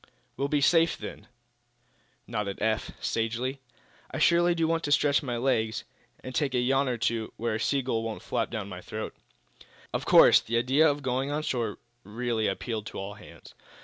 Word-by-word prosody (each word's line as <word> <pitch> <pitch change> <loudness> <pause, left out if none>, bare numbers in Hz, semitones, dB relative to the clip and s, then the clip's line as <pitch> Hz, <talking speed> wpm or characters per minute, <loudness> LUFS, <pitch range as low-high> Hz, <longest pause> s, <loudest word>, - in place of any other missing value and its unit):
"We'll 140 - -1
be 145 0 +1
safe, 165 +3 +4
then," - - -8 1.0
nodded 105 -4 -3
Eph, 110 0 0
sagely. 120 +4 -2 0.5
"I - - -5
surely 175 0 +4
do 165 -1 +1
want 165 0 0
to 145 - -2
stretch 145 -1 +4
my 125 -5 -3
legs, 110 -4 0 0.4
and 130 - -7
take 135 0 0
a - - +3
yawn 135 +2 +2
or 120 - -1
two 115 -1 -1
where 115 0 -1
a 110 - -2
sea 135 +3 +1
gull 120 -3 -1
won't 115 -1 -5
flap - - -1
down 110 -4 -4
my 90 -2 -8
throat." 110 +2 -6 0.8
Of - - -2
course, - - +8
the 115 +1 -2
idea 135 +6 +4
of 145 0 -2
going 130 +1 -1
on 150 +1 -2
shore 115 -7 -2 0.3
really 115 +1 -1
appealed 110 +2 -3
to - - -8
all 100 +1 -5
hands. 105 +1 -14
120 Hz, 185 wpm, -28 LUFS, 110-140 Hz, 1.0 s, course